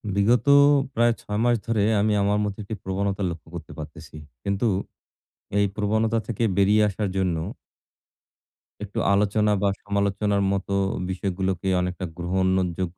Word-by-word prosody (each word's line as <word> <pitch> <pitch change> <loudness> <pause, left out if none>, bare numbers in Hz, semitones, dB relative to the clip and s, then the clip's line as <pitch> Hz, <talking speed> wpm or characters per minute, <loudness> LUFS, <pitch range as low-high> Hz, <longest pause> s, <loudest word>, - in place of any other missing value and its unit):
বিগত 115 +4 +3 0.5
প্রায় 120 0 +3
৬ 105 0 -3
মাস 120 0 +4
ধরে 115 -2 +1 0.2
আমি 105 0 +2
আমার 100 +1 +2
মধ্যে 105 0 -4
একটি 110 +2 -5
প্রবণতা 100 +1 -2
লক্ষ্য 85 -1 -8
করতে 80 -2 -8
পারতেছি। 75 0 -10 0.3
কিন্তু 100 +3 -1 0.9
এই 100 - +4
প্রবণতা 110 +2 +1
থেকে 115 0 -2
বেরিয়ে 100 +2 +4
আসার 100 0 -2
জন্য 95 -3 +1 1.5
একটু 105 -1 -4
আলোচনা 105 +1 +2
বা 100 - +2 0.2
সমালোচনার 100 0 0
মত 100 -1 -2 0.4
বিষয়গুলোকে 95 -1 -2
অনেকটা 90 0 -3
গ্রহণযোগ্য 95 0 -1
100 Hz, 130 wpm, -24 LUFS, 95-105 Hz, 1.5 s, মাস